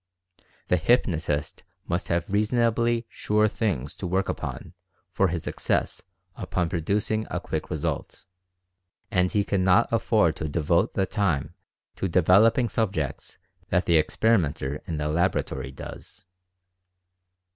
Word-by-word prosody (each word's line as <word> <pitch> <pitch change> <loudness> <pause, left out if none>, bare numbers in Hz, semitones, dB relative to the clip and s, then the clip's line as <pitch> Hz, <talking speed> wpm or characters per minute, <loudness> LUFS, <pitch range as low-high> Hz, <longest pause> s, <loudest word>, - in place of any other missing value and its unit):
The 90 - +4
hypnotist 80 - 0 0.2
must 85 +1 -2
have 85 0 0
reasonably 115 +2 +1
"sure 105 +1 +1
things" 90 - -2
to 95 - -4
work 95 +2 0
upon - - -5 0.4
for 95 - +2
his 85 -2 -3
success - - -1 0.3
upon 90 -2 -2
pro 85 - -1
ducing 105 +5 -1
a - - -2
quick - - -4
result, - - -4 0.9
and 90 0 +2
he 105 - +2
cannot 95 -2 +2
afford - - +2
to 80 - -3
devote 85 +3 +1
the 95 - +2
time 90 -7 -1 0.4
to 95 - -1
"developing" 95 +8 +4
subjects 95 - -2 0.3
that 90 0 +1
the 85 -2 +5
experi 110 +6 +2
menter 70 -1 -4
in 80 - -3
the 75 0 -2
laboratory 80 -3 -1
does. 65 - -11
90 Hz, 130 wpm, -26 LUFS, 80-105 Hz, 0.9 s, the